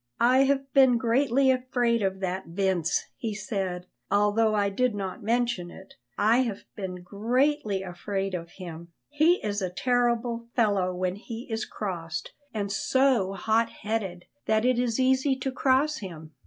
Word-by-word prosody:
"I 255 +3 +5
have 275 -1 0
been 260 -3 +6
greatly 260 +2 +3
afraid 245 -2 +1
of 190 -1 -1
that 190 0 -3
Vince," 180 -1 0
he 220 -3 -3
said. 190 -3 -3 0.2
"Although 210 +2 +3
I 200 -1 +2
did 250 +2 +1
not 195 +3 -4
mention 235 -5 0
it, 190 +2 -13 0.2
I 220 +3 +4
have 230 -6 -1
been 185 -3 -6
greatly 220 +2 0
afraid 195 +2 -3
of 170 -2 -4
him; 170 -2 -9 0.2
he 310 +4 +4
is 205 0 -1
a 185 - -1
terrible 235 +2 0
fellow 200 -6 +2
when 180 +1 -2
he 230 +2 -8
is 225 0 -1
crossed, 175 -5 -5 0.2
and 205 -3 -3
so 245 -3 +2
hot 220 +4 +1
headed 200 -6 -4 0.2
that 220 +1 +2
it 250 -1 +3
is 245 -1 0
easy 265 +1 +3
to 265 0 -3
cross 275 +3 +2
him. 160 -6 -8
220 Hz, 155 wpm, -27 LUFS, 190-250 Hz, 0.2 s, been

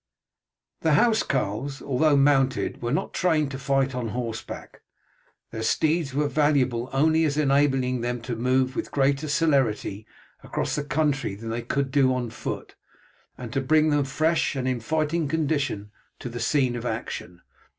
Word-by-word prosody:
The 160 - +2
housecarls, 135 - +1
although 145 +2 +2
mounted, 135 -1 +2
were 120 0 -2
not 150 - -1
trained 155 -5 +1
to 135 - -5
fight 135 0 +1
on 125 -2 -3
horseback. 115 0 -6 0.7
Their 110 - -5
steeds 155 +4 +1
were 145 +1 +2
valuable 135 -5 +1
only 160 +4 +3
as 150 -2 0
enabling 135 -3 +2
them 120 +1 -2
to 120 0 -4
move 130 +2 +1
with - - -3
greater 140 +2 +1
celerity 135 -9 +1 0.4
across - - -2
the 150 - -2
country 140 -6 0
than 115 +2 -6
they 115 +1 -2
could 140 +2 -2
do 130 -2 +3
on 120 -3 -3
foot, 110 - -6 0.6
and 120 -2 -7
to 135 - 0
bring 155 +3 +3
them 145 -1 +2
fresh 155 +3 +1
and 130 -1 -2
in 130 -2 0
fighting 155 +5 0
condition 140 -9 -1 0.3
to 125 - -6
the 120 0 -6
scene 125 +1 +1
of 120 - -5
action. 110 -6 -5
135 Hz, 160 wpm, -25 LUFS, 120-150 Hz, 0.7 s, only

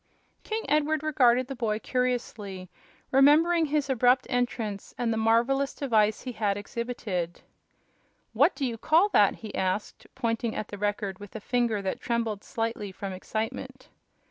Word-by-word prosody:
King 445 +1 -3
Edward 305 +1 +1
regarded 255 -5 +3
the 270 - -6
boy 225 -3 -1
curiously, 220 -7 -3 0.4
remembering 315 +5 +5
his 295 -1 0
abrupt 250 -1 +3
entrance 230 -5 -2
and 235 -2 0
the - - -1
marvelous 235 +5 +2
device 220 -6 +2
he 255 - -4
had 205 -4 -1
exhibited. 205 -5 -4 0.9
"What 280 - +4
do 275 - -2
you 230 -3 -3
call 330 - +4
that?" 205 - +4
he 215 - -7
asked, 190 +2 -2
pointing 230 0 -1
at 215 - -4
the 205 - -7
Record 205 -2 -2
with 205 0 -11
a - - -3
finger 230 -2 0
that 190 - -3
trembled 230 -3 -1
slightly 225 -4 -3
from 195 0 -6
excitement. 220 +4 -5
230 Hz, 150 wpm, -27 LUFS, 210-265 Hz, 0.9 s, remembering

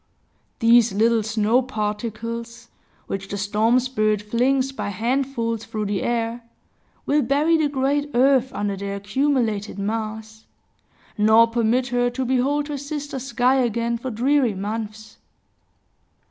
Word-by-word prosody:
These 230 -2 +4
little 225 +2 +3
snow 220 +3 +1
particles, 230 0 -5 0.4
which 195 0 -5
the 200 - -5
storm 215 +5 +2
spirit 215 -5 0
flings 255 +5 +1
by 270 - -4
handfuls 230 +1 -1
through 215 -2 -4
the 200 -1 -1
air, 235 0 -1 0.6
will 295 +1 +2
bury 290 +6 +2
the 310 -2 +2
great 285 +1 0
earth 260 0 +3
under 205 -1 -2
their 200 +1 -4
accumulated 215 -1 -1
mass, 220 +1 -5 0.7
nor 220 +2 +6
permit 235 +2 0
her 245 0 +1
to 255 +2 -3
behold 270 +4 +1
her 290 -2 -4
sister 285 -1 -5
sky 255 0 +1
again 235 -1 0
for 260 - -4
dreary 250 0 +1
months. 215 +2 -6
235 Hz, 130 wpm, -22 LUFS, 215-260 Hz, 0.7 s, nor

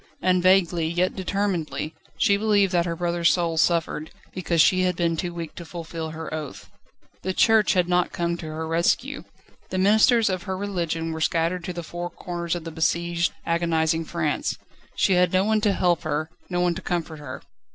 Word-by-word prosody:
And 185 -1 +2
vaguely, 175 -3 +3
yet 175 +3 0
determinedly, 185 -5 -2 0.2
she 200 - +4
believed 205 -2 +2
that 175 0 +2
her 170 - -2
brother's 170 0 +1
soul 170 -2 0
suffered, 160 -2 +1 0.2
because 175 -2 -1
she 185 +4 +5
had 180 -1 +1
been 170 -1 +1
too 175 +2 -3
weak 170 -2 -6
to 175 - -8
fulfil 165 -1 -6
her 160 0 -7
oath. 155 -2 -7 0.5
The 190 +2 -2
Church 220 -3 +4
had 180 -1 +2
not 180 0 +1
come 170 0 -1
to 165 - -7
her 160 +1 -4
rescue. 200 - 0 0.4
The 185 - -3
ministers 220 +4 +4
of 185 -2 -1
her 190 - -1
religion 170 -5 -2
were 160 0 -5
scattered 170 +2 0
to 180 - -4
the 170 0 -5
four 175 +1 -5
corners 175 0 -4
of 175 - -5
besieged, 170 +1 0
agonising 165 -1 +1
France. 160 -2 -1 0.4
She 190 - +3
had 180 -1 +3
no 185 0 +3
one 215 +1 +2
to 210 -1 +3
help 175 -3 +2
her, 155 +2 -2 0.2
no 175 -1 0
one 175 -1 +2
to 180 - -7
comfort 165 -4 -3
her. 130 -3 -8
175 Hz, 190 wpm, -24 LUFS, 165-185 Hz, 0.5 s, she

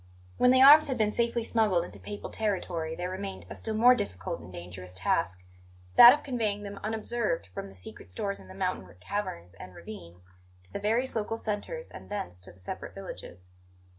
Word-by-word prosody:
When 250 - +6
the 260 +1 +6
arms 300 +3 +9
had 265 -3 -1
been 215 -2 +2
safely 235 +1 0
smuggled 210 -7 +2
into - - -10
Papal 205 0 -7
territory 175 -6 -2
there 180 +2 -4
remained 195 +1 -6
a - - -3
still 220 - -3
more 245 +3 +7
difficult 95 - -3
and 85 +2 -12
dangerous 90 +1 -8
task: 90 -1 0 0.5
that 240 - +12
of 290 - 0
conveying 220 -6 -2
them 200 -1 -7
unobserved 215 - -2
from - - -5
the 95 - -13
secret 90 -1 -9
stores 100 +2 -3
in 95 - -14
the 95 - -12
mountain - - -2
caverns 90 - -4
and 90 -2 -11
ravines 90 -4 -11 0.4
to 90 - -16
the - - -3
various 230 +6 0
local 225 +1 -2
centres 225 - -4
and - - -11
thence 90 - -5
to 90 - -7
the 90 - -20
separate 95 - -7
villages. 90 +1 -9
200 Hz, 195 wpm, -29 LUFS, -, 0.5 s, that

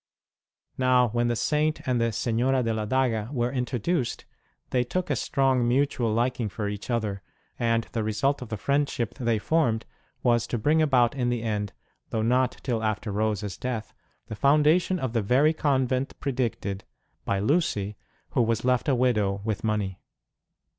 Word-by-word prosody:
Now, 125 -1 +4
when 120 +2 0
the 120 - +1
Saint 150 +5 0
and 125 -2 +1
the 115 0 +1
Senora 120 +4 +1
de 115 -1 0
la 110 -1 -2
Daga 120 -3 +1
were 120 -3 0
introduced, 125 +2 -1 0.5
they 125 -1 +2
took 175 +6 -2
a - - +2
strong 130 -1 +1
mutual 125 -2 +1
liking 120 0 0
for 105 +1 -4
each 105 +2 -6
other, 110 -5 -1 0.4
and 115 -1 +2
the 115 - -1
result 130 +7 0
of 125 - -7
the 110 - -3
friend 140 +6 +1
ship 120 -1 -3
they 115 -4 0
formed 115 -2 +1 0.4
was 120 -1 +2
to 120 - -2
bring 150 +8 +2
about 130 -5 +3
in 125 -3 -1
the 120 -2 -1
end 105 -3 -2 0.4
(though 110 - -1
not 125 +2 +2
till 120 -4 -1
after 110 0 -1
Rose 105 0 0
s 100 -2 -5
death) 115 -4 -4 0.3
the - - -7
foundation 150 - +3
of 130 -8 -3
the 115 - +2
very 135 +9 +3
convent 130 -4 0
predicted, 115 -7 -2 0.4
by 100 - 0
Lucy, 105 - 0 0.4
who - - +2
was 115 0 0
left 125 +2 +2
a 135 - +3
widow 105 -6 +1
with 110 -2 -2
money. 105 -4 -1
120 Hz, 175 wpm, -26 LUFS, 110-130 Hz, 0.5 s, Now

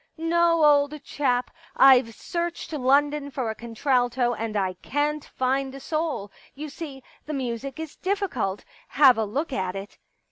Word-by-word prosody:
* - - -48
No, 335 0 +3
old 290 0 +3
chap, 250 -4 -1 0.3
I've 255 -4 +6
searched 340 +3 -4
London 285 +1 +2
for 260 -5 -2
a - - -7
contralto 245 +1 0
and 220 -1 -3
I 190 -2 0
can't 295 +1 -1
find 265 +1 -1
a - - -8
soul. 310 -9 -3 0.2
You 300 +2 -6
see, 280 -3 -8 0.2
the 305 - -3
music 265 +2 -4
is 320 -2 -7
difficult; 370 - -2 0.2
have 270 -3 +6
a 220 - +1
look 275 +8 -3
at 185 -4 -2
it.' 195 +1 -8
275 Hz, 155 wpm, -25 LUFS, 240-300 Hz, 0.3 s, I've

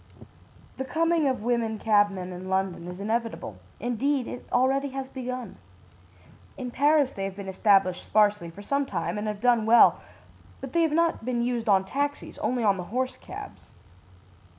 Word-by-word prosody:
"The 265 - -2
coming 330 +2 +1
of 260 -5 -1
women 230 -2 0
cabmen 205 -4 +1
in 185 +1 -8
London 190 -2 -1
is 180 +1 -7
inevitable 220 - -3 0.2
indeed, 250 +3 0
it 245 - -8
already 270 +3 +2
has 270 0 -5
begun. 250 -5 -6 1.0
In 250 -2 -5
Paris 290 0 +3
they 195 - -4
have 195 -1 -5
been 200 -1 -8
established 190 -1 +2
sparsely 210 -4 +2
for 200 +5 -11
some 280 +5 0
time 210 - -3
and 210 - -3
have 210 -1 -4
done 240 -3 +3
well, 235 +1 +6 0.6
but 270 -2 -8
they 335 - +3
have 325 -2 +2
not 335 -4 +1
been 240 0 -1
used 240 -2 -1
on 190 -1 +4
taxis, 285 +7 -3
only 245 -2 -1
on 200 -2 +3
the 180 - -5
horse 255 +6 -2
cabs. - - -10
235 Hz, 170 wpm, -26 LUFS, 200-265 Hz, 1.0 s, well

